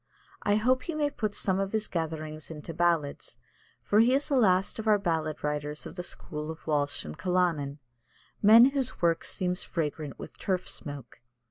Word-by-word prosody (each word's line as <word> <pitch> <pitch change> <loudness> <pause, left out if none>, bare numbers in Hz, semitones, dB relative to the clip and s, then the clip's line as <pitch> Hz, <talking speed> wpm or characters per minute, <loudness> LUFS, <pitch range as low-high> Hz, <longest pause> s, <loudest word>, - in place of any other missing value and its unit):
I 205 - +2
hope 255 +4 +2
he 330 +5 -4
may 295 -1 +1
put 215 -7 -2
some 190 -1 0
of 195 +1 -2
his 220 -1 0
gatherings 155 -2 -4
into 160 +1 -7
ballads, 165 -4 0 0.5
for 210 - +3
he 245 +4 +5
is 280 - 0
the 280 - +2
last 195 -4 +3
of 220 - -4
our 210 -1 +6
ballad 160 -5 -2
writers 150 0 -3
of - - -8
the 180 - -3
school 150 -3 -6
of 160 0 -8
Walsh 145 - 0
and 75 0 -7
Callanan 170 -6 0 0.6
men 230 +5 +8
whose 270 -3 -2
work 170 -1 +2
seems 180 0 -1
fragrant 150 -3 -3
with - - -10
turf 185 -2 -1
smoke. 140 -7 -6
175 Hz, 185 wpm, -29 LUFS, 155-210 Hz, 0.6 s, men